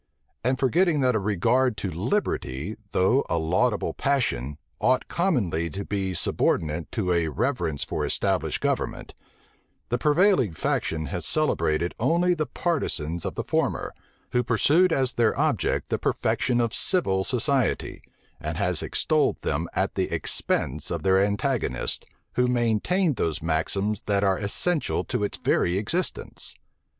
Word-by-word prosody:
And 130 +2 +1
forgetting 150 +4 +2
that 130 -1 +3
a 110 - +1
regard 110 +5 +1
to 95 - -3
liberty, 90 - -2 0.2
though 110 +9 +3
a - - +1
laudable 90 +8 +1
passion, 75 - 0 0.2
ought 130 0 +2
commonly 100 - 0
to 100 +6 -5
be 95 -2 -2
subordinate 80 0 0
to 95 -5 0
a 85 -2 +1
reverence 80 - -1
for - - -3
established - - 0
government, - - -2 0.8
the 120 - 0
prevailing 150 - +3
faction 80 0 -1
has 90 -2 -2
celebrated 85 - +1
only 170 +9 +3
the 155 -3 -2
partisans 85 - -2
of - - -3
the - - -2
former, - - -1 0.4
who 125 - +2
pursued 150 +10 +3
as 130 -4 +1
their 115 -2 +2
object 150 -6 0
the - - 0
perfection 125 -2 0
of 115 -1 0
civil 95 - 0
society, 130 +1 0 0.4
and - - -4
has - - +1
extolled - - +1
them 80 +4 -1
at - - 0
the - - -1
expense 75 +3 -1
of 85 -2 -3
their 95 0 +4
antagonists, 100 0 -1 0.3
who 125 0 +2
maintained 125 - +1
those 80 -4 -1
maxims 95 +6 0
that 100 -1 +2
are 95 -2 +2
essential 150 - 0
to - - -2
its 100 - -2
very 90 +2 +1
existence. 165 - -2
110 Hz, 140 wpm, -25 LUFS, 85-135 Hz, 0.8 s, their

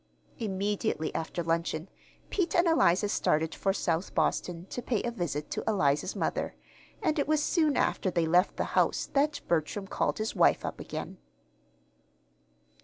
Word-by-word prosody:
Immediately 200 -5 -1
after 165 +1 -3
luncheon 165 0 -1 0.4
Pete 360 -4 0
and 345 - +5
Eliza 205 - +4
started 160 -5 +1
for 195 - 0
South 175 -2 -1
Boston 170 +2 0
to 245 - -3
pay 235 -3 -1
a 240 - -1
visit 165 - -3
to - - -2
Eliza's 150 -10 +1
mother, - - -2 0.5
and 315 -3 +1
it 285 - +1
was 305 -1 +2
soon 310 -5 +2
after 190 - +1
they 170 -2 +1
left 175 +4 +3
the - - +1
house - - +2
that 290 +1 +2
Bertram 170 +4 0
called - - -1
his 215 0 -2
wife - - +4
up - - -5
again. - - -6
195 Hz, 155 wpm, -29 LUFS, 165-245 Hz, 0.5 s, and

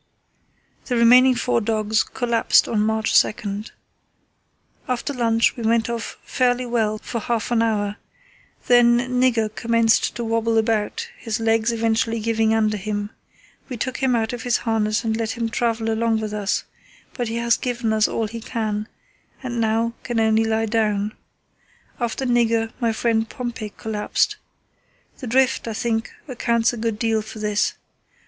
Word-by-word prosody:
The 250 - -1
remaining 250 +2 +6
four 240 -1 0
dogs 215 0 +1
collapsed 235 -2 +2
on 220 - 0
March 220 +1 +3
2. 205 -1 -4 1.2
"After 250 +3 -2
lunch 230 -2 +2
we 240 - -7
went 230 +1 +1
off 230 -1 -5
fairly 250 -1 +1
well 220 -3 0
for 230 +2 -5
half 230 +1 -2
an 235 -1 +3
hour. 210 -2 0 0.7
Then 240 -1 +5 0.2
Nigger 225 -4 +2
commenced 230 0 +2
to 235 - -3
wobble 230 0 0
about, 220 -1 0
his 225 -1 -3
legs 225 0 +2
eventually 225 0 0
giving 225 0 +1
under 215 -1 +2
him. 205 +1 -4 0.6
We 250 - -5
took 255 +3 -3
him 260 -2 +1
out 225 0 -1
of 240 - -5
his 245 0 +1
harness 215 -2 +1
and 220 -1 0
let 225 +1 -3
him 230 -1 -1
travel 225 -1 -1
along 225 0 +1
with 215 -1 -4
us, 205 -1 -1 0.5
but 245 -3 -3
he 225 - -3
has 235 0 +2
given 240 -3 -2
us 215 -1 +3
all 225 - -1
he 230 +2 -7
can, 215 -2 -3 0.6
and 240 -2 -2
now 225 +1 +1
can 240 -2 -2
only 220 0 +3
lie 225 0 +1
down. 210 -1 0 0.9
After 240 +2 -2
Nigger, 230 -2 +2
my 235 -2 +1
friend 225 0 0
Pompey 235 -4 -5
collapsed. 215 -1 -1 0.8
The 255 - -6
drift, 255 +1 +2
I 225 - -3
think, 225 0 -1 0.2
accounts 235 -3 +1
a - - -5
good 225 -1 -2
deal 225 -1 +1
for 220 +1 -10
this. 210 -1 0
225 Hz, 160 wpm, -22 LUFS, 220-235 Hz, 1.2 s, remaining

